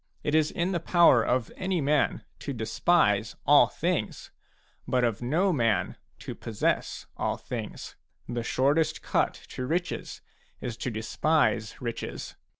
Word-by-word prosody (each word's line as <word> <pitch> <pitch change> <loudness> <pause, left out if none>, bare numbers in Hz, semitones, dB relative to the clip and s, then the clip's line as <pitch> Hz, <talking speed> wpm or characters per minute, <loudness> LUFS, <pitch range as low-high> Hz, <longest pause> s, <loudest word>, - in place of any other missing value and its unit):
It 150 - -1
is 155 -1 +4
in 175 +2 -1
the 175 - 0
power 165 -7 +5
of 125 -2 0
any 185 -1 -1
man 145 0 +1 0.2
to 140 - -4
despise 110 -2 +2
all - - +7
things, - - -2 0.6
but 125 -1 +1
of 115 -3 0
no 170 +10 +2
man 115 -7 +1 0.3
to - - -6
possess - - -2
all - - -1
things. - - -6 0.3
The 120 0 -2
shortest 145 +6 +1
cut - - +1
to 125 - -5
riches 175 +4 -3 0.4
is 120 -2 -4
to 125 - -3
despise 110 +1 0
riches. 120 -2 -5
135 Hz, 140 wpm, -27 LUFS, 115-160 Hz, 0.6 s, all